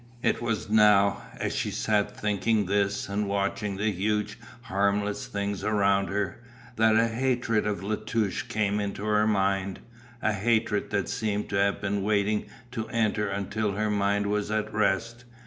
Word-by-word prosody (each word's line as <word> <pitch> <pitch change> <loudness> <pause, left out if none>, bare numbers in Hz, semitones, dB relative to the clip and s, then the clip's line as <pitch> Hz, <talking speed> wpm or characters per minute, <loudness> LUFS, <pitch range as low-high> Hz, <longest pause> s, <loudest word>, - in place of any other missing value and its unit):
It - - +1
was 115 -6 -2
now, 105 -2 +5 0.2
as - - -2
she - - -1
sat 105 -2 0
thinking 105 +1 +1
this 100 +1 0
and 100 +1 -1
watching 100 0 -1
the 105 +2 +1
huge 105 +2 -1 0.2
harmless 100 +1 0
things 100 -1 -3
around 100 -2 +2
her, 100 +2 -2 0.3
that 110 -1 +4
a 115 +1 +4
hatred 115 -2 0
of 100 -2 -2
La 105 +2 -1
Touche 110 -2 -1
came 105 -1 0
into 100 0 -3
her 105 0 +3
mind, 95 -2 +1 0.4
a 110 - +1
hatred 110 +1 +1
that 100 -2 -1
seemed 105 -1 -2
to 100 - -3
have 100 0 +2
been 100 -1 -1
waiting 105 +1 +1 0.2
to 115 -3 -4
enter 110 -2 0
until 100 +1 -2
her 105 +1 0
mind 100 0 +1
was 105 0 -1
at 110 0 -1
rest. 110 +3 0
105 Hz, 165 wpm, -27 LUFS, 100-110 Hz, 0.4 s, now